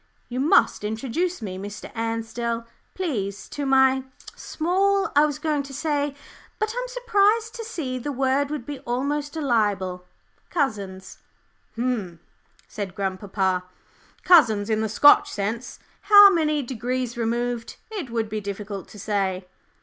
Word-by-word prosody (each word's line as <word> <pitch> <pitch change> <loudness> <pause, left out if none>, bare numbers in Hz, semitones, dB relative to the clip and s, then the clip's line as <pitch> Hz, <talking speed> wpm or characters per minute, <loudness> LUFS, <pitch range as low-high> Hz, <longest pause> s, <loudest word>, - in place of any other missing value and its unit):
"You 250 +1 -3
must 280 -5 +3
introduce 265 +10 -2
me, 185 -2 -5
Mr. 205 +1 -8
Ansdell, 230 +1 -3 0.3
please, 205 - -3
to 285 -1 -4
my 265 0 +4 0.3
small, 390 +4 0
I 295 +1 +6
was 295 -1 -4
going 300 -1 0
to 275 -1 -9
say, 290 -2 -1 0.4
but 430 0 -1
I'm - - -2
surprised 450 -2 +2
to 470 -2 -6
see 300 - -4
the 290 +4 -4
word 270 +1 +1
would 295 -5 -4
be 285 -1 -6
almost 285 +4 -2
a 320 - -3
libel 200 -8 0 0.4
cousins." 200 - -3 0.6
"Umph," 225 -9 -2 0.5
said 195 -4 -6
grandpapa, 190 -1 -1 0.6
"'cousins,' 225 - +5
in 215 0 +1
the 220 - -1
Scotch 400 - +6
sense; 220 +5 -4 0.2
how 410 -1 +9
many 305 -4 +1
degrees 250 0 -3
removed, 235 0 -2 0.2
it 380 - -5
would 230 -1 -1
be 215 0 -4
difficult 200 0 -6
to - - -13
say." 195 -2 -1
250 Hz, 140 wpm, -24 LUFS, 210-300 Hz, 0.6 s, how